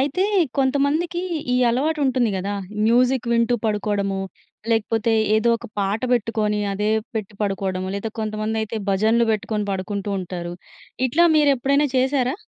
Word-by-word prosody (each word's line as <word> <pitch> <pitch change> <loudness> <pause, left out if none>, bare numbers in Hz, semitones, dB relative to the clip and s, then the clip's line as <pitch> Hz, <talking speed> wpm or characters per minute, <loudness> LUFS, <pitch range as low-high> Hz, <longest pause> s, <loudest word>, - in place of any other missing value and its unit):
అయితే 290 +8 +1 0.3
కొంతమందికి 285 +6 +1 0.3
ఈ - - +3
అలవాటుంటుంది 265 -2 +1
కదా. 195 +2 -3 0.3
మ్యూజిక్ 250 +2 +3
వింటూ 235 +1 +2
పడుకోడము. 205 -2 -1 0.5
లేకపోతే 225 0 +1 0.2
ఏదో 220 +2 +2
ఒక - - -9
పాట 200 +2 0
పెట్టుకొని 215 -3 0
అదే 210 +2 0 0.2
పెట్టి 215 -2 -4
పడుకోడము. 190 -2 -2
లేదా 200 +2 -3
కొంతమందైతే 220 +1 -2
భజనలు 220 +4 +3
పెట్టుకొని 210 0 -2
పడుకుంటూంటారు. 190 -3 -4 0.5
ఇట్లా 325 +8 +3
మీరెప్పుడైనా 280 0 +3
చేశారా? 260 0 +1
225 Hz, 115 wpm, -22 LUFS, 205-260 Hz, 0.5 s, ఈ